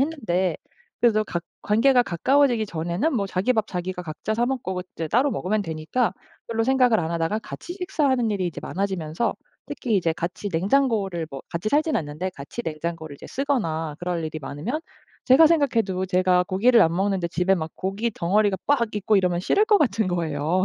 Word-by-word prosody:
했는데 195 - 0 0.4
그래도 215 -3 +3
가 175 -4 -3 0.2
관계가 245 +4 +4
가까워지기 245 - +2
전에는 175 - -1
뭐 200 -5 0
자기 195 +6 +1
밥 220 -3 0
자기가 180 -1 -4
각자 170 +6 -4
사 235 +2 +1
먹고 210 -9 -2
이제 165 - -2
따로 255 - +3
먹으면 210 -1 -1
되니까 165 +6 -1 0.4
별로 225 0 0
생각을 250 -3 +4
안 160 - -3
하다가 170 +5 0
같이 280 +9 -8
식사하는 290 - 0
일이 195 -3 -1
이제 175 - -5
많아지면서 190 +1 -2 0.3
특히 230 -5 -1
이제 170 -4 +1
같이 175 +5 -4
냉장고를 195 -2 +1
뭐 135 - -6
같이 170 +6 -2
살진 310 +2 +2
않는데 155 +4 -3
같이 140 +11 -7
냉장고를 160 -1 -4
이제 - - -11
쓰거나 165 - -1
그럴 175 -1 -2
일이 155 0 -4
많으면 150 - -4 0.5
제가 270 +5 +7
생각해도 230 - +1
제가 185 -1 +3
고기를 220 +5 +4
안 165 0 +2
먹는데 190 -2 0
집에 180 +3 +2
막 160 -3 -4
고깃덩어리가 200 0 0
빡 235 -7 +1
있고 210 +1 +2
이러면 180 -2 +2
싫을 405 - +3
것 420 -2 +5
같은 225 - +1
거예요. 165 0 0
195 Hz, 400 characters per minute, -24 LUFS, 170-240 Hz, 0.5 s, 제가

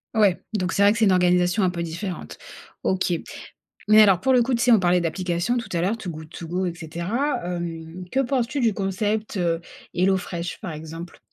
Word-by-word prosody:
Ouais, 205 -5 +4
donc 185 -5 -1
c'est 200 - +3
vrai 200 - +7
que 220 - -1
c'est 220 - +5
une 195 - +4
organisation 180 +2 +3
un 185 - +2
peu 170 -1 -4
différente. 170 +3 -5 0.5
OK. 185 -1 +1 0.7
Mais 215 0 +8
alors 195 -4 +6
pour 265 - +3
le 250 - +5
coup 250 +1 +1
tu 235 - 0
sais 245 - +4
on 225 - +7
parlait 180 -1 +3
d'applications 175 +6 -1
tout 230 -3 -4
à 170 - 0
l'heure 195 +6 +1
Too 195 -5 -6
Good 155 -1 -8
To 170 - -8
Go, 180 +3 -1
et 175 - -2
cetera. 170 - -2
Hem, 170 0 -5
que 265 - +2
penses-tu 260 +1 -1
du 230 -4 +2
concept, 205 +2 -2
heu, 170 -1 0 0.3
HelloFresh 180 -1 -1
par 180 - -5
exemple? 160 +2 -8
185 Hz, 210 wpm, -24 LUFS, 170-215 Hz, 0.7 s, Mais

